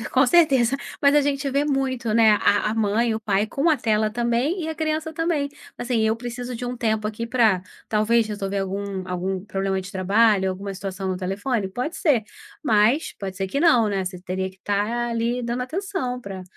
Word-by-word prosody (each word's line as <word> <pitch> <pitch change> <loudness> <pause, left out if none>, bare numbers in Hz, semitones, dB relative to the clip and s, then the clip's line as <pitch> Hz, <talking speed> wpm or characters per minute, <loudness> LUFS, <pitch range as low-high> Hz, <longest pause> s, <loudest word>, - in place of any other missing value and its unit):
e - - -6
com 260 +1 +4
certeza. 275 -5 +4 0.3
Mas 280 0 +5
a 295 - +6
gente 280 0 -1
vê 280 +2 +1
muito, 260 -5 -1
né, 225 -1 +6
a 205 +1 +2
a 220 - -2
mãe, 225 +2 +1
o 220 - -3
pai 210 -1 +1
com 280 +9 0
a 310 - +4
tela 215 -3 +1
também 240 - 0
e 315 - -3
a 320 - -3
criança 315 0 -2
também. 320 -3 0 0.3
Assim: 245 -1 0
"Eu 220 +1 +2
preciso 245 +1 -6
de 250 - -5
um 245 0 -4
tempo 220 -2 0
aqui 220 +2 -4
pra, 225 -7 +3 0.3
talvez, 220 +1 +2
resolver 200 -2 -3
algum 195 -1 -3
algum 185 +1 -3
problema 195 -2 -1
de 185 +1 -9
trabalho, 195 +1 +3
alguma 195 +1 -5
situação 190 0 -5
no 185 - -1
telefone"? 195 +3 -2
Pode 250 - -4
ser. 270 -9 +2 0.4
Mas 230 +4 +3
pode 190 -1 -5
ser 195 -2 -2
que 280 +9 -2
não, 245 -10 +5
né, 195 -2 -1
você 180 -1 -6
teria 190 +1 -3
que 190 - -22
estar 210 +5 -1
ali 235 +2 -1
dando 240 +1 -2
atenção 320 -4 -3
pra 195 -4 -7
225 Hz, 205 wpm, -23 LUFS, 195-255 Hz, 0.4 s, a